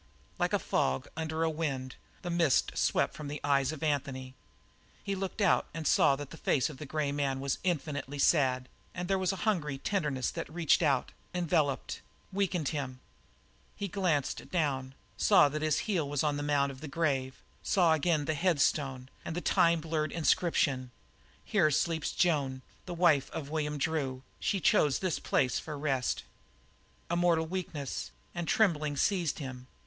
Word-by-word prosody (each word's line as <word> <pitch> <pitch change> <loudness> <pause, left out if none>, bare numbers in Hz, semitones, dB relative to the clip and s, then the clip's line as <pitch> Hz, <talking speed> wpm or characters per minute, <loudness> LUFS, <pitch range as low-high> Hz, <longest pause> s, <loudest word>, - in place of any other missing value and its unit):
Like - - +1
a - - +3
fog 65 0 0
under 160 0 -2
a 165 - +2
wind, 135 -5 -3 0.3
the 175 - -3
mist 170 -5 +3
swept - - +1
from 150 - -7
the 145 +1 -4
eyes 140 -1 +2
of 155 -1 -7
Anthony; 135 -3 -2 0.7
he 200 - -2
looked 195 +2 -3
out 200 - +3
and 165 -1 -4
saw 140 - +5
that 145 0 -8
the 165 - -9
face 145 0 +1
of 140 - -11
the 150 - -7
grey 150 -1 -1
man 140 -2 -1
was 135 0 -1
infinitely 145 -5 -2
sad, 130 -4 +3 0.3
and 180 -1 -3
there 195 0 +1
was 185 -1 +1
a - - -3
hungry 155 -10 0
tenderness 145 -6 -1
that - - -6
reached 170 +1 +3
out, 140 -6 +2 0.2
enveloped, 160 -5 0 0.3
weakened 185 -6 0
him. 130 -4 -4 0.8
He 200 - -3
glanced 175 -8 -1
down, 135 -6 -1 0.2
saw 145 - +6
that 155 +2 -3
his 155 -1 +1
heel 175 -9 0
was 145 0 0
on 150 -1 +1
the 145 - -3
mount 145 -1 +1
of 130 0 -12
the 155 - -6
grave; 135 -4 -1 0.2
saw 175 -4 +3
again 155 -1 +1
the 155 - 0
headstone 145 -5 +1 0.2
and 165 - -5
the - - 0
time 170 -2 +3
blurred 155 -1 -1
inscription: 150 -6 +1 0.6
"Here 190 -8 +3
sleeps 160 +1 0
Joan, 140 -7 +1 0.2
the 175 - -4
wife 155 -6 +3
of 150 -3 -6
William 150 -1 -1
Drew. 140 -4 -1 0.2
She 195 - 0
chose 150 -5 +3
this 185 -4 -1
place 125 -3 +1
for 150 -2 -6
rest." 135 -3 -1 0.8
A 170 - -1
mortal 170 -2 +3
weakness 160 -6 -4 0.2
and 170 -1 -4
trembling 155 -9 +2
seized 175 -5 +1
him. 130 -3 -7
150 Hz, 170 wpm, -31 LUFS, 140-170 Hz, 0.8 s, saw